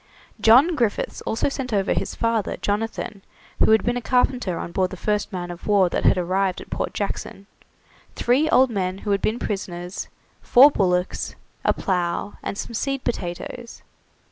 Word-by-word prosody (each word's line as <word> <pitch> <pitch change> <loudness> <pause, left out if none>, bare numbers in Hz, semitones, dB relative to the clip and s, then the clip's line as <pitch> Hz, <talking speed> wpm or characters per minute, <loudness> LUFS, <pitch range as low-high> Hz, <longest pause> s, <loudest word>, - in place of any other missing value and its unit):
John 260 +10 +6
Griffiths 235 -7 -1
also 225 - 0
sent 270 -2 -4
over 200 -2 +1
his - - -3
father, 230 -3 0
Jonathan, 210 -1 -3 0.4
who - - +4
had 220 -2 +5
been 240 +1 0
a - - -3
carpenter 245 -7 +1
on - - -5
board 185 +1 +1
the 185 - -8
first 210 +3 -1
man 175 -2 -4
of 175 - -10
war 200 -3 +4
that - - -2
had - - +5
arrived 185 +1 0
at - - -12
Port - - -2
Jackson, 200 -1 -4 0.7
three 270 +6 +2
old 260 -3 +5
men 185 -3 -2
who 205 - 0
had 200 - +1
been 220 - 0
prisoners, 180 -4 -4 0.3
four 275 +4 +7
bullocks, 180 -5 0 0.3
a - - +3
plough, 180 +1 -1
and 200 - -4
some 235 - -5
seed 275 +3 -2
potatoes. 230 +4 -5
205 Hz, 170 wpm, -23 LUFS, 185-240 Hz, 0.7 s, four